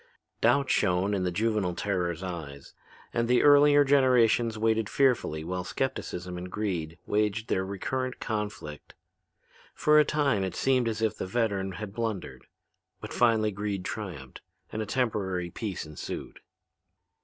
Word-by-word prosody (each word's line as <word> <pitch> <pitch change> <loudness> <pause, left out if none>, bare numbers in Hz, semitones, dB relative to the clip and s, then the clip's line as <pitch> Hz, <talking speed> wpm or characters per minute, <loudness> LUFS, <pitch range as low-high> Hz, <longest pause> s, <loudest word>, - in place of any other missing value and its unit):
Doubt 130 +4 +3
shone 95 +1 +2
in 95 -2 0
the 90 - 0
juvenile 105 -2 0
terror's 90 -3 -2
eyes 75 -7 -7 0.4
and 115 0 0
the 125 0 +3
earlier 145 0 +7
generations 125 -4 +4
waited 110 -1 +1
fearfully 120 - +1
while 90 +2 -3
skepticism 90 -7 -3
and 90 +1 -7
greed 85 -6 -3
waged 105 +1 0
their 95 - +1
recurrent 130 +7 -3
conflict. 105 -9 -5 0.8
For 150 0 +5
a - - +7
time 140 -9 +1
it 95 - -3
seemed 130 -3 +2
as 110 0 -2
if 110 - 0
the - - -4
veteran 100 -3 -1
had 100 +1 -7
blundered; 110 -4 -4 0.5
but - - -8
finally 110 -3 +3
greed 100 -2 -3
triumphed - - -6 0.3
and 110 - -3
a 110 - -4
temporary 95 -8 -1
peace 100 -5 -4
ensued. 75 -1 -7
105 Hz, 145 wpm, -28 LUFS, 90-120 Hz, 0.8 s, earlier